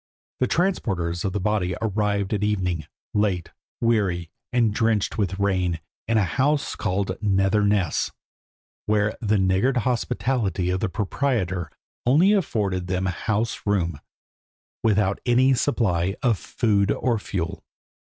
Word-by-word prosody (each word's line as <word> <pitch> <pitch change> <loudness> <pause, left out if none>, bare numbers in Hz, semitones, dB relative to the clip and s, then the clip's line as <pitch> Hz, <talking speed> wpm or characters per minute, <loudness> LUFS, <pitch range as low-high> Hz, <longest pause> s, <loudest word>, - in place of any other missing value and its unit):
The 130 - +2
transporters 95 - 0
of 95 - 0
the 105 - -2
body 95 -2 0
arrived 105 -2 0
at 105 -1 0
evening, 90 -7 -1 0.3
late, 100 -5 0 0.3
weary, 95 -8 +1 0.2
and 120 -4 +2
drenched 110 -1 +1
with 95 -2 0
rain, 90 -4 0 0.3
in 115 0 +2
a 105 - +4
house 140 - 0
called 95 -2 -1
Nether 95 0 +2
Ness, 100 -5 +1 0.8
where 105 0 +2
the 110 -2 +2
niggard 95 +7 +2
hospitality 115 -6 0
of 95 - 0
the 105 - -1
proprietor 95 - -1 0.3
only 160 - +5
afforded 100 - 0
them 95 0 -1
house 105 +4 -1
room, 85 -7 0 0.8
without 105 -3 +2
any 125 +2 +4
supply 95 -9 +1
of 120 -6 +2
food 105 -4 +1
or 120 0 +1
fuel. 90 -5 -4
105 Hz, 130 wpm, -24 LUFS, 95-115 Hz, 0.8 s, only